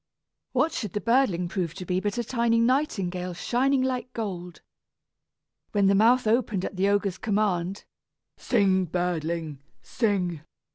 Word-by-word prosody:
What 325 - +2
should 210 - -4
the 210 - -1
birdling 230 -7 +2
prove 170 -3 -3
to 185 -2 -7
be 180 +1 0
but 205 +4 -2
a 240 - 0
tiny 235 -1 +1
nightingale 195 - 0
shining 260 +8 +1
like 255 -1 -2
gold! 180 -6 -5 1.1
When 200 -2 +3
its - - +3
mouth 235 +5 +4
opened 215 -4 +1
at - - -5
the 195 +2 +2
ogre's 200 -2 0
command, 200 -3 -1 0.5
"Sing, 190 -5 +2
birdling, 165 -3 -2 0.2
sing!" 185 -8 -1
200 Hz, 140 wpm, -26 LUFS, 180-235 Hz, 1.1 s, mouth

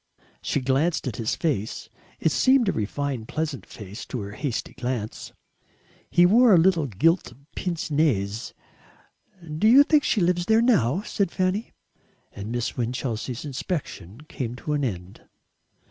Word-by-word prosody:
She 145 - -1
glanced 135 +5 +1
at 115 - -4
his 115 -2 -1
face 135 - -2 0.3
it 160 - +1
seemed 260 - +4
a - - +3
refined 120 +2 -3
pleasant 150 - -4
face 105 0 -9
to 125 - -4
her 100 0 -6
hasty 120 +2 -4
glance. 120 -3 -4 0.8
He 175 - +5
wore 225 +3 +6
a - - +6
little 165 -3 +3
gilt 135 - +1 0.2
pince 170 -3 -3
nez. 115 -9 0 1.0
"Do 215 - +4
you 265 +5 +8
think 295 -1 +3
she 215 - +1
lives 175 -1 +1
there 220 0 +5
now?" 185 - +2
said 200 -3 -1
Fanny, 185 +5 -1 0.6
and 100 +2 -7
Miss 120 0 -2
Winchelsea's 120 +1 -3
inspection 135 - -5
came 125 -5 -5
to 150 +4 -4
an 145 -1 0
end. 95 -6 -5
145 Hz, 145 wpm, -25 LUFS, 115-180 Hz, 1.0 s, you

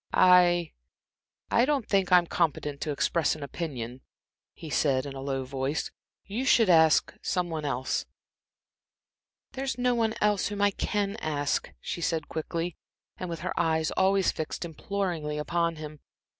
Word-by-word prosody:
"I 175 -2 +5 0.8
I 235 - +4
don't 275 -3 +1
think 195 -3 +1
I'm 180 -1 +6
competent 150 -4 -1
to 155 - -1
express 155 +3 +1
an 155 - -8
opinion," 130 -5 -5 0.5
he 160 - -9
said, 135 -2 +2
in 140 - -6
a 135 - -7
low 135 -1 -2
voice. 135 +3 -2 0.3
"You 215 +6 -3
should 230 -7 +5
ask 160 -2 +5
some 180 -2 -1
one 155 -2 -3
else." 130 -2 -1 1.4
"There's 265 -2 -3
no 250 0 +2
one 225 -2 0
else 210 -2 +2
whom 205 0 -5
I 205 - +4
can 205 +1 -2
ask," 145 -2 -1
she 170 - -5
said 165 -2 -1
quickly, 165 +2 -3 0.4
and 185 - -5
with 165 -2 -5
her 180 - -2
eyes 160 -1 +1
always 190 0 +3
fixed 160 +2 -4
imploringly 170 -3 -3
upon 170 +2 0
him. 155 -1 -8
170 Hz, 155 wpm, -28 LUFS, 150-195 Hz, 1.4 s, I'm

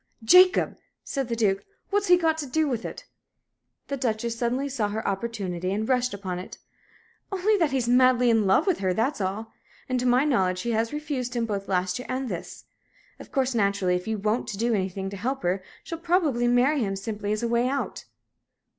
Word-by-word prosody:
"Jacob!" 365 +9 +5 0.2
said 275 -3 -3
the 235 - -2
Duke. 200 -4 +1 0.3
"What's 410 0 +1
he 355 0 +7
got 325 -2 +2
to 290 - -3
do 310 +4 +1
with 240 -5 -2
it?" - - -7 0.8
The 280 - -3
Duchess 235 -2 -1
suddenly 245 +4 -1
saw 255 -6 -1
her 220 +2 -3
opportunity, 195 -4 -2
and 215 +2 -1
rushed 250 -1 +1
upon 190 -3 -4
it. 180 - -9 0.7
"Only 395 +3 +2
that 330 -5 +2
he's 260 -3 -1
madly 250 0 +5
in 220 -3 +3
love 190 - +4
with 380 -4 +1
her, 185 -2 0
that's 230 +1 0
all. 205 +4 -3 0.4
And, 255 -1 0
to 250 - 0
my 250 +3 +4
knowledge, 190 -10 +2
she 235 +6 -2
has 225 0 0
refused 285 -5 -3
him 235 -1 0
both 200 -3 -3
last 185 +2 0
year 250 - -8
and 260 0 -2
this. 175 -4 -7 0.5
Of - - -12
course, 265 -2 +1
naturally, 200 -4 +1
if 180 +2 -4
you 220 -1 -1
won't 215 +3 -1
do 235 +2 +1
anything 195 -1 -2
to 200 - -6
help 260 +7 -3
her, 180 +2 0 0.2
she'll 330 - -6
probably 330 -9 +1
marry 250 +5 +3
him 195 -5 -1
simply 205 +1 -4
as 215 +2 -1
a - - +1
way 235 +1 +2
out." 275 +1 -3
235 Hz, 205 wpm, -26 LUFS, 200-270 Hz, 0.8 s, he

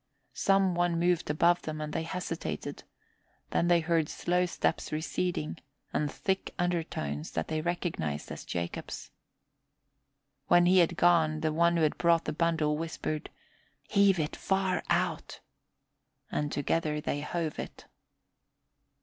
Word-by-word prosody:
Some 195 -1 +3
one 175 -1 +1
moved 175 -2 +1
above 170 +4 +3
them 155 0 -5
and 150 0 -4
they - - 0
hesitated, 165 - -4 0.7
then 170 - +2
they 175 -1 +5
heard 165 -2 +1
slow 180 +1 +1
steps - - -1
receding 160 +1 -2 0.3
and 150 -2 0
thick 190 -1 -2
undertones 160 - -2
that - - -2
they 155 0 -1
recognized 155 - -2
as - - -6
Jacob's. 85 0 -5 1.4
When 175 0 +6
he 185 +1 +6
had 170 -1 +3
gone, 160 -3 +4
the 155 -1 0
one 170 +1 +3
who 165 - +2
had 155 - +1
brought 170 -1 +3
the 150 - -2
bundle 155 -2 +1
whispered, 155 -1 -3 0.6
"Heave 200 -2 +4
it 150 -1 -1
far 190 -3 0
out," - - 0 0.9
and 150 0 -1
together 150 +1 0
they 145 -1 -2
hove 160 0 -3
it. - - -7
165 Hz, 135 wpm, -30 LUFS, 155-175 Hz, 1.4 s, When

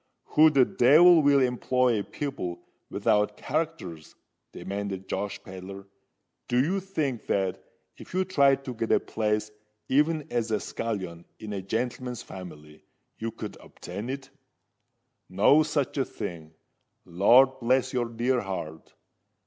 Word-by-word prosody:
"Who 155 +1 +7
the 135 -4 +4
devil 160 +9 +6
will 140 -1 +4
employ 125 -2 +1
people 120 -9 -5 0.3
without 105 0 +1
characters?" 140 - -4 0.4
demanded 100 -1 -5
Josh 100 -1 -3
Pedler. 95 +1 -9 0.6
"Do 125 - +1
you 175 +9 +1
think 155 - -3
that 95 -2 -1 0.3
if - - -13
you 185 +1 0
tried 140 -6 +3
to 130 - -4
get 115 -1 -3
a - - +5
place 105 -1 -2 0.4
even 150 +2 +2
as 115 -2 -1
a 110 -1 +1
scullion 95 -9 -5
in 105 -1 -7
a 100 - -3
gentleman's 120 +4 -3
family, 75 -5 -11 0.4
you 115 - -2
could 110 -2 -8
obtain 100 +7 -8
it? 135 0 -6 1.0
No 105 +11 +5
such 150 -2 -1
a 135 - +2
thing. 80 -2 -7 0.5
Lord 125 +9 +5
bless 130 +1 +1
your 125 -2 0
dear 120 +2 0
heart! 80 -5 -7
120 Hz, 135 wpm, -27 LUFS, 100-135 Hz, 1.0 s, Who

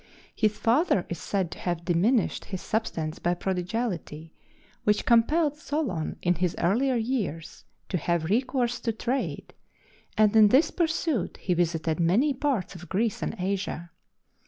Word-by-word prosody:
His 215 -1 +1
father 230 - +2
is 170 - -4
said 190 -4 -2
to - - -8
have 175 -1 -3
diminished 190 +7 +1
his 190 -2 -6
substance 165 -8 -2
by 175 +1 0
prodigality, 180 -4 -3 0.5
which 210 0 +2
compelled 290 +6 +3
Solon 285 - -2
in 175 - +3
his 180 0 -1
earlier 245 +10 +2
years 220 - -3 0.2
to 180 - -1
have 170 +1 0
recourse 245 - 0
to 230 - -1
trade, 250 +4 -3 0.6
and 215 0 +4
in 215 -1 +8
this 265 +9 +4
pursuit 325 - -1
he 180 - -1
visited 165 -2 0
many 210 - +3
parts 265 -9 -1
of 175 -1 -11
Greece 215 +2 0
and - - -2
Asia. 185 -2 -3
205 Hz, 145 wpm, -27 LUFS, 175-245 Hz, 0.6 s, in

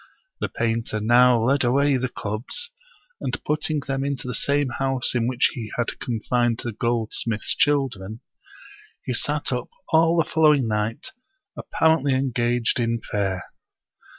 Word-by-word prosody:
The - - -2
painter 115 -1 -1
now 120 +2 +5
led 135 +2 +3
away 140 +3 +3
the 130 0 -1
cubs, 115 - -5 0.5
and - - -3
putting 155 0 0
them 135 0 -2
into 140 -2 -3
the 125 - -3
same 140 +4 0
house 135 +1 0
in 120 -2 +1
which 125 -1 +2
he 115 -4 -6
had 120 - -2
confined 120 0 0
the 120 - -3
goldsmith's 115 -1 -1
children, 120 -8 0 0.8
he - - -1
sat - - -1
up - - -2 0.2
all 165 +1 +4
the 165 - +2
following 150 -6 +4
night 105 +1 -2 0.4
apparently 160 -4 +2
engaged 120 -2 0
in 115 -1 0
prayer. 95 -4 -2
125 Hz, 140 wpm, -23 LUFS, 115-140 Hz, 0.8 s, now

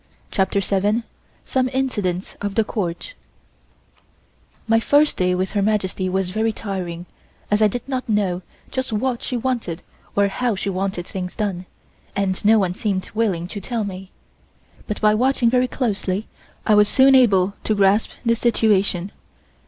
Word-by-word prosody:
CHAPTER 195 +1 +1
SEVEN 205 +4 +1 0.4
SOME 260 -1 +1
INCIDENTS 210 -9 -2
OF 205 -1 -3
THE 225 - +4
COURT 200 - -4 1.5
MY 225 0 +4
first 290 +6 +3
day 180 0 +1
with 185 +1 -1
Her 205 - 0
Majesty 195 -2 0
was 190 0 -1
very 220 +3 +1
trying 180 -5 -5 0.5
as 210 +1 +3
I 215 - +6
did 240 +5 -5
not 260 -3 -3
know 195 -4 +1 0.3
just 260 -2 -2
what 235 +3 -1
she 250 - -2
wanted 230 -9 -2 0.3
or 200 0 +4
how 235 +3 -1
she 195 +1 -2
wanted 185 -2 -2
things 180 -1 -5
done, 190 -4 -3 0.5
and 195 -2 -1
no 220 +2 +6
one 185 -4 +1
seemed 190 -1 -2
willing 200 -7 0
to 205 - -6
tell 230 +2 -2
me; 190 -1 -6 0.8
but 210 - -3
by 210 -1 +4
watching 245 +1 +2
very 250 0 +3
closely 210 -5 -2 0.4
I 215 - +4
was 210 0 +6
soon 270 +4 +5
able 200 -7 +4
to 215 - +1
grasp 200 +2 +3 0.2
the 230 0 +3
situation. 205 -5 +1
205 Hz, 160 wpm, -21 LUFS, 190-230 Hz, 1.5 s, I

